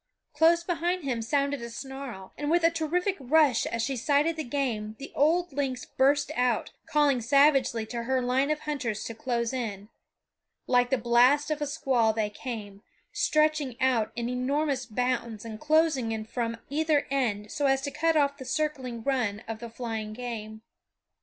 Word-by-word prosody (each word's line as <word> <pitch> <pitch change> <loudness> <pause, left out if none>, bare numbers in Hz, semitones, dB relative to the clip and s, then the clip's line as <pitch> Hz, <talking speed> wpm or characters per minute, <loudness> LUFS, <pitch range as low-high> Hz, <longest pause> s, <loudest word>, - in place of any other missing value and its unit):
Close 330 +3 +4
behind 350 0 -1
him 250 -4 -1
sounded 280 +3 0
a 235 - -6
snarl, 260 -5 -8
and 295 0 -3
with 340 +1 +3
a 330 - +5
terrific 345 +4 0
rush 275 -2 +3
as 230 0 -2
she 270 +3 -1
sighted 290 +6 +2
the 315 - -3
game 235 -6 -2
the 275 - -9
old 335 +3 +2
lynx 265 -3 -2
burst 285 +2 +2
out, 245 -2 +1 0.2
calling 290 -4 +2
savagely 270 -2 +3
to 235 +1 -4
her 260 +2 0
line 255 +3 +1
of 305 0 -1
hunters 255 -8 -3
to 230 - -5
close 235 +1 -2
in. 210 -5 -4 0.8
Like 245 -1 +3
the 265 - +2
blast 245 +6 +4
of 300 -1 -2
a 295 - 0
squall 245 -5 +1
they 215 -1 -1
came, 210 -4 -7 0.3
stretching 305 -5 +1
out 250 -4 +2
in 235 -1 -2
enormous 260 +1 -1
bounds 235 -2 -2
and 220 -1 -7
closing 305 -5 +2
in 220 -1 -3
from 230 0 -3
either 305 0 +1
end 215 -6 -1
so 290 -2 0
as 270 0 +2
to 280 - -4
cut 325 +1 +1
off 280 -1 +2
the - - -6
circling 260 -5 -2
run 225 -6 -1
of 225 -1 -5
the 235 0 -7
flying 225 -2 -5
game. 220 -2 -6
260 Hz, 175 wpm, -28 LUFS, 230-290 Hz, 0.8 s, a